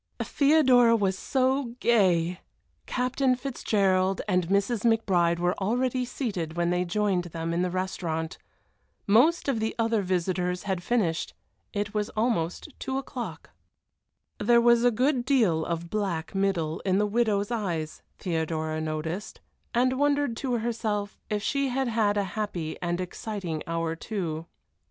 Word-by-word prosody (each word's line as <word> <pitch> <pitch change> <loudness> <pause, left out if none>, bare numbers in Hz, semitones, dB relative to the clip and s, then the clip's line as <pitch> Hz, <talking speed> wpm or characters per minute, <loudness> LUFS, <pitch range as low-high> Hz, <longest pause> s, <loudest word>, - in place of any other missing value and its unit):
Theodora 260 -6 +5
was 195 -4 +1
so 260 +2 0
gay! 180 -7 +3 0.5
Captain 255 +1 +1
Fitzgerald 195 -7 +1
and 180 -4 +1
Mrs. 200 +5 +1
McBride 190 -7 +3
were 175 +1 +1
already 250 +5 0
seated 185 - -4
when 175 0 +1
they 180 0 +1
joined 185 0 0
them 165 0 -4
in 170 - +1
the 180 - +1
restaurant. 175 -3 -3 0.7
Most 265 +13 +4
of 265 -5 +1
the 220 0 -2
other 225 -2 +1
visitors 180 -1 -1
had 190 -3 -2
finished 180 -6 0 0.4
it 205 0 -3
was 210 -1 -1
almost 215 - 0
two 265 -1 -2
o'clock. 265 -2 -6 0.9
There 240 0 +5
was 235 0 +5
a 245 - +6
good 250 +3 +1
deal 225 - +2
of 170 0 -4
black 190 -6 -2
middle 190 -5 0
in 190 -1 +1
the 210 - +3
widow's 210 -1 +1
eyes, 175 -9 -3 0.2
Theodora 160 -2 -2
noticed, 160 +5 -4 0.3
and 255 +2 +2
wondered 285 -4 +2
to 260 -3 -2
herself 220 -3 -2
if 210 -1 -1
she 275 +3 +1
had 265 +1 0
had 215 -3 +1
a 205 - +2
happy 180 -7 -3
and 175 0 -1
exciting 180 -3 -4
hour 165 -1 -1
too. 165 -4 -4
205 Hz, 140 wpm, -27 LUFS, 175-240 Hz, 0.9 s, a